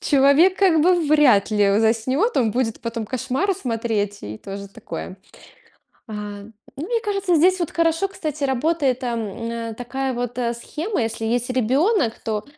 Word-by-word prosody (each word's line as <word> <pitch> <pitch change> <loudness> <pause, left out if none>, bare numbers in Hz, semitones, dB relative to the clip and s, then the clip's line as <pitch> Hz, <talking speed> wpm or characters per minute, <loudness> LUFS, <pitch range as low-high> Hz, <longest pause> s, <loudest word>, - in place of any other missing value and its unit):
человек 285 +6 +4
как 365 -5 +4
бы 365 +3 +5
вряд 260 -10 +4
ли 205 -2 +3
у 200 - +3
заснёт, 255 - +1
он 230 -4 +3
будет 225 0 -1
потом 230 -1 -4
кошмары 260 - -1
смотреть, 225 - -2
и 105 +1 -7
тоже 200 0 -8
такое. 195 -2 -8 0.9
А, 220 - -8 0.6
ну, 295 - -4
мне 470 +1 0
кажется, 395 -3 +1
здесь 365 +4 +4
вот 345 - -2
хорошо, 335 +3 +1
кстати, 310 -6 -5
работает 275 0 +1
там 230 -3 -4
на 230 -1 -4
такая 260 +3 -3
вот, 245 0 -4
э, 235 -1 0
схема: 310 - -3
если 225 0 -3
есть 240 +2 0
ребёнок, 260 - +2
то, 215 -2 -2
250 Hz, 160 wpm, -22 LUFS, 225-320 Hz, 0.9 s, бы